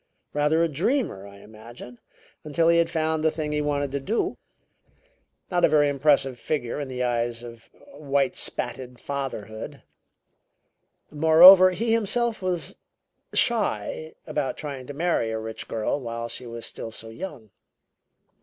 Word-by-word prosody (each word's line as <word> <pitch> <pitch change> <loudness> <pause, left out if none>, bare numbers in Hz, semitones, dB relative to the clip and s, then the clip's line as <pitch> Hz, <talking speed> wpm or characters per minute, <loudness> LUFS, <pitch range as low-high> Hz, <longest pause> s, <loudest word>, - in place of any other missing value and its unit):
Rather 150 +3 +2
a - - +3
dreamer, 165 - -1
I 100 0 -14
imagine, 115 +3 -12 0.4
until 165 +2 +1
he 170 0 +5
had 165 0 +2
found 160 -1 -1
the 160 - +4
thing 155 -1 -4
he 150 0 0
wanted 145 -2 -1
to 140 - -2
do. 210 +12 -1 1.2
Not 175 -1 +1
a - - +6
very 150 -1 +4
impressive 140 -3 +2
figure 140 -4 -3
in 145 - -4
the 125 -1 -3
eyes 120 -1 -1
of 115 -1 -12 0.2
whitespatted 130 - -2
fatherhood. 110 -6 -6 1.3
Moreover, 170 +5 +9
he 220 +6 -1
himself 230 +1 +1
was 180 -2 -2 0.6
shy 475 -2 0
about - - -2
trying 140 -4 -7
to 145 - -6
marry 165 -8 0
a 110 - -2
rich 110 0 -7
girl 110 +5 -2
while 115 -2 -5
she 120 +1 -7
was 115 0 -7
still - - -6
so 110 0 -7
young. 125 - -8
145 Hz, 145 wpm, -25 LUFS, 120-165 Hz, 1.3 s, Moreover